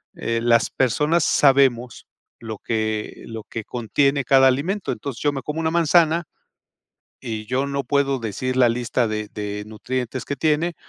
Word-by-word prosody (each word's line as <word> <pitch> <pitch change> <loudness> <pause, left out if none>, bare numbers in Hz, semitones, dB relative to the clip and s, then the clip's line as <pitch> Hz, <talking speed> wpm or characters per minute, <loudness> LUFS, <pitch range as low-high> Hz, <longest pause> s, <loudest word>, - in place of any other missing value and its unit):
eh, 115 0 -2
las 115 -1 +3
personas 150 +6 +1
sabemos 130 -4 +2 0.3
lo 110 -2 -7
que, 110 -1 -3
lo 110 -1 -7
que 115 -2 -7
contiene 140 +4 0
cada 135 +1 +5
alimento. 170 +10 0
Entonces, 135 -5 -7
yo 145 -1 +1
me 135 - -4
como 150 +4 -4
una 160 0 0
manzana, 170 0 +3 1.0
y 110 -2 -5
yo 130 +3 0
no 140 0 -2
puedo 140 -2 0
decir 130 +4 -3
la 125 -2 +5
lista 120 0 0
de 105 0 -3
de 105 0 -4
nutrientes 125 +3 -4
que 140 - -4
tiene, 155 +3 +1
130 Hz, 160 wpm, -22 LUFS, 115-145 Hz, 1.0 s, cada